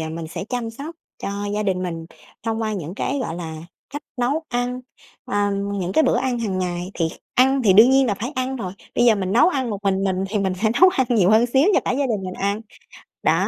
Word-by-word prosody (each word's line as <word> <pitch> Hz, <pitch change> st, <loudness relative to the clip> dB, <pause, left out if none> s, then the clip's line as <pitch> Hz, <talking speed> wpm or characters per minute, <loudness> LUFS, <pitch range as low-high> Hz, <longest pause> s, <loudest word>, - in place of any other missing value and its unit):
ờ, 160 Hz, -, -3 dB
mình 165 Hz, 0 st, -5 dB
sẽ 165 Hz, -, -5 dB
chăm 235 Hz, 0 st, -3 dB
sóc 290 Hz, +8 st, -8 dB, 0.3 s
cho -, -, -2 dB, 0.2 s
gia 210 Hz, -, 0 dB
đình 190 Hz, -3 st, 0 dB
mình 165 Hz, -2 st, -4 dB, 0.4 s
thông 225 Hz, 0 st, -2 dB
qua 215 Hz, -1 st, -1 dB
những 175 Hz, -4 st, -5 dB
cái, 280 Hz, +6 st, -2 dB
gọi 165 Hz, -, -3 dB
là, 160 Hz, -2 st, -6 dB, 0.3 s
cách 290 Hz, +2 st, -6 dB
nấu 265 Hz, +6 st, 0 dB
ăn, 245 Hz, +1 st, -2 dB, 0.4 s
ờ, 205 Hz, 0 st, 0 dB
những 200 Hz, -2 st, -2 dB
cái 315 Hz, -, +4 dB
bữa -, -, +3 dB
ăn 255 Hz, -2 st, -1 dB
hàng 205 Hz, -5 st, -2 dB
ngày 180 Hz, 0 st, -3 dB
thì 165 Hz, -2 st, 0 dB
kh -, -, -11 dB, 0.2 s
ăn 265 Hz, +1 st, +4 dB
thì 200 Hz, -, +6 dB
đương 220 Hz, +6 st, +7 dB
nhiên 270 Hz, 0 st, +4 dB
là 210 Hz, -, +1 dB
phải 240 Hz, +8 st, -5 dB
ăn 260 Hz, 0 st, -2 dB
rồi, 185 Hz, -7 st, -5 dB, 0.2 s
bây 240 Hz, -, +3 dB
giờ 235 Hz, -2 st, +6 dB
mình 190 Hz, -2 st, -2 dB
nấu 240 Hz, -, +5 dB
ăn 265 Hz, -8 st, -1 dB
một 205 Hz, -, -3 dB
mình 195 Hz, 0 st, +1 dB
mình 190 Hz, 0 st, 0 dB
thì 210 Hz, +1 st, -1 dB
mình 190 Hz, -2 st, 0 dB
sẽ 220 Hz, -, +4 dB
nấu 370 Hz, -, +9 dB
ăn 260 Hz, -7 st, +1 dB
nhiều 205 Hz, -6 st, +4 dB
hơn 220 Hz, +2 st, +5 dB
xíu 270 Hz, +8 st, +3 dB
cho -, -, +4 dB
cả -, -, -1 dB
gia 275 Hz, +2 st, 0 dB
đình 215 Hz, -6 st, -1 dB
mình 185 Hz, 0 st, -5 dB
ăn. 200 Hz, +2 st, -1 dB, 0.6 s
Đó, -, -, +2 dB
215 Hz, 260 wpm, -22 LUFS, 190-255 Hz, 0.6 s, nấu